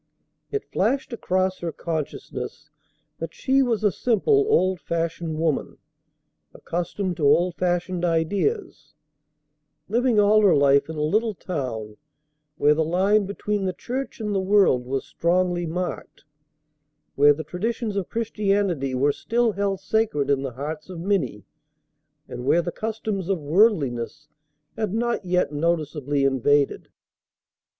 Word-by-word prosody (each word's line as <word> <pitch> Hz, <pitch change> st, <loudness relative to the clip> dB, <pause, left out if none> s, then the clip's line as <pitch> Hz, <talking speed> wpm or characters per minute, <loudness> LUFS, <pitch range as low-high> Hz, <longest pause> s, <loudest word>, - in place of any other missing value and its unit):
It 420 Hz, -1 st, -3 dB
flashed 245 Hz, +6 st, 0 dB
across 185 Hz, -4 st, 0 dB
her 170 Hz, -1 st, -3 dB
consciousness 160 Hz, -2 st, -5 dB, 0.5 s
that 165 Hz, 0 st, -6 dB
she 270 Hz, +1 st, +2 dB
was 230 Hz, -5 st, 0 dB
a 205 Hz, -, +4 dB
simple, 410 Hz, -, +2 dB
old 185 Hz, -, +2 dB
fashioned 165 Hz, -1 st, -3 dB
woman, 160 Hz, -3 st, -1 dB, 0.8 s
accustomed 175 Hz, +1 st, -3 dB
to 145 Hz, -, +2 dB
old 175 Hz, +5 st, +4 dB
fashioned 175 Hz, 0 st, -1 dB
ideas, 175 Hz, -, -1 dB, 0.9 s
living 235 Hz, +1 st, +2 dB
all 210 Hz, +1 st, +5 dB
her 200 Hz, -4 st, +5 dB
life 140 Hz, +1 st, +4 dB
in 160 Hz, -, -5 dB
a 150 Hz, -, -1 dB
little 215 Hz, +7 st, +1 dB
town 120 Hz, -, -5 dB, 0.6 s
where 150 Hz, +1 st, +4 dB
the 160 Hz, +1 st, +1 dB
line 190 Hz, +5 st, +2 dB
between 205 Hz, 0 st, -2 dB
the 185 Hz, -, -1 dB
church 265 Hz, +5 st, -5 dB
and 210 Hz, -2 st, -2 dB
the 195 Hz, -, +1 dB
world 190 Hz, -11 st, +3 dB
was 135 Hz, 0 st, -2 dB
strongly 175 Hz, 0 st, 0 dB
marked, 180 Hz, +3 st, -5 dB, 0.9 s
where 145 Hz, +1 st, +6 dB
the 150 Hz, +2 st, -1 dB
traditions 215 Hz, -, -3 dB
of 195 Hz, -3 st, -2 dB
Christianity 200 Hz, -, 0 dB
were 140 Hz, +3 st, +3 dB
still 235 Hz, +6 st, 0 dB
held 200 Hz, -1 st, -1 dB
sacred 205 Hz, -11 st, 0 dB
in 135 Hz, -1 st, +2 dB
the 135 Hz, -3 st, -4 dB
hearts 150 Hz, +6 st, -6 dB
of 180 Hz, -3 st, -7 dB
many 165 Hz, -, -1 dB, 0.8 s
and 125 Hz, -, -7 dB
where 170 Hz, +6 st, +3 dB
the 175 Hz, -, -3 dB
customs 215 Hz, -4 st, -3 dB
of 190 Hz, -3 st, +1 dB
worldliness 150 Hz, -, +1 dB, 0.5 s
had 215 Hz, -2 st, -2 dB
not 235 Hz, -1 st, 0 dB
yet 180 Hz, -4 st, +1 dB
noticeably 150 Hz, -3 st, -1 dB
invaded. 135 Hz, +1 st, +2 dB
180 Hz, 135 wpm, -24 LUFS, 150-210 Hz, 0.9 s, where